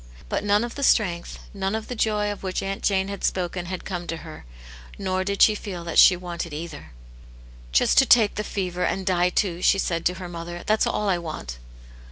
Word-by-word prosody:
But - - -1
none 205 +1 +3
of 240 - -5
the 280 - -7
strength, 180 -10 +1 0.2
none 195 +1 -2
of 220 0 -4
the - - -4
joy 210 -2 0
of 205 - -7
which 185 -1 -3
Aunt 195 0 -4
Jane 190 -1 +1
had 200 -1 -6
spoken 180 -1 -1
had 185 0 -5
come 175 -2 -5
to 165 - -3
her, 155 - -10 0.3
' - - -16
nor 185 -1 -1
did 200 +1 +2
she 215 - +6
feel 190 -4 -6
that 170 -1 +1
she 185 - +8
wanted 170 -2 -6
cither. 155 - -7 0.8
"Just - - +4
to 270 - +4
take 220 -4 +6
the 210 - -3
fever, 180 -3 -3
and 190 0 -1
die 180 -1 +2
too!" 180 -1 -1
she 195 - +4
said 170 -3 -1
to 180 - -2
her 185 -1 -7
mother. 175 0 -7
" - - -20
That's 215 +1 +2
all 210 - -1
I 185 -3 +2
want." 155 - -7
185 Hz, 230 wpm, -24 LUFS, 175-205 Hz, 0.8 s, she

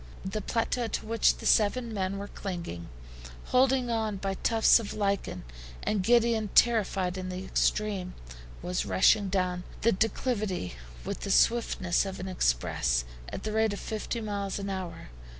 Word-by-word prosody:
The 195 +3 -3
plateau 230 +3 -1
to 220 - -3
which 225 0 +3
the - - -10
seven 225 +2 +3
men 195 -1 -2
were 200 +1 -5
clinging, 170 - -6 0.6
holding 255 -1 +3
on 220 -3 -1
by 195 0 -2
tufts 225 +4 +4
of 220 - -6
lichen, 200 - -1 0.4
and 210 -2 0
giddy 235 +3 +4
and 215 -2 -3
terrified 195 -5 +3
in 185 0 -5
the 185 +1 -5
extreme, 200 -4 0 0.5
was 180 0 -1
rushing 200 +1 +3
down 180 -2 -1 0.2
the 230 - +4
declivity 215 - -1 0.3
with - - -4
the - - -5
swiftness 195 -5 +3
of 195 -1 -6
an 185 - -5
express, - - +1 0.2
at - - -6
the 215 - -2
rate 220 -1 +2
of 200 - -5
fifty 220 +1 -4
miles 200 -2 -3
an 200 -1 -4
hour. 185 - -6
200 Hz, 160 wpm, -29 LUFS, 185-225 Hz, 0.6 s, tufts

